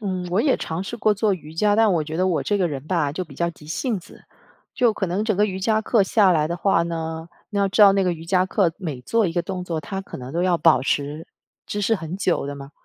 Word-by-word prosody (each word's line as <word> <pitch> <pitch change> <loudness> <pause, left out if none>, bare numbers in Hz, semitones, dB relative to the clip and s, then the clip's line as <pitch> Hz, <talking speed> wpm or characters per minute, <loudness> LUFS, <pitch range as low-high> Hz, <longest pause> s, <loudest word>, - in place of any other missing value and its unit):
嗯， 185 -3 -3
我 190 +5 +2
也 275 -1 +2
尝 165 +3 -4
试 235 +5 -6
过 215 -2 +2
做 205 -1 +1
瑜 155 -3 -11
伽， 205 +5 +2
但 220 -3 +4
我 165 - +1
觉 160 +1 -5
得 185 - +1
我 180 -4 0
这 205 - 0
个 185 -3 +1
人 140 0 -6
吧， 155 -6 0
就 185 +3 -3
比 145 -4 -14
较 170 +3 -1
急 155 -2 -16
性 215 - -2
子， 195 - -17 0.5
就 240 -3 +3
可 - - -2
能 190 +5 -1
整 215 -4 0
个 210 - +4
瑜 190 -2 -3
伽 220 +2 +2
课 220 -1 +3
下 195 0 +4
来 155 -3 +2
的 170 - -2
话 170 -1 +2
呢， 160 -1 -4 0.2
你 205 - -2
要 200 -1 +2
知 210 +2 +4
道 200 - +8
那 195 0 +2
个 180 -2 +1
瑜 165 0 -8
伽 185 +2 +2
课 185 -4 +1
每 155 -10 -5
做 225 - +1
一 165 - -2
个 175 - 0
动 185 0 -5
作， 170 -3 -3
它 195 +4 -5
可 195 - -9
能 130 +2 -8
都 170 - 0
要 180 -2 +2
保 165 -6 +4
持 145 +3 -2 0.4
姿 205 - -3
势 225 +3 +2
很 165 -2 -5
久 180 -7 0
的 145 - -5
嘛， 140 0 -10
180 Hz, 305 characters per minute, -22 LUFS, 160-200 Hz, 0.5 s, 道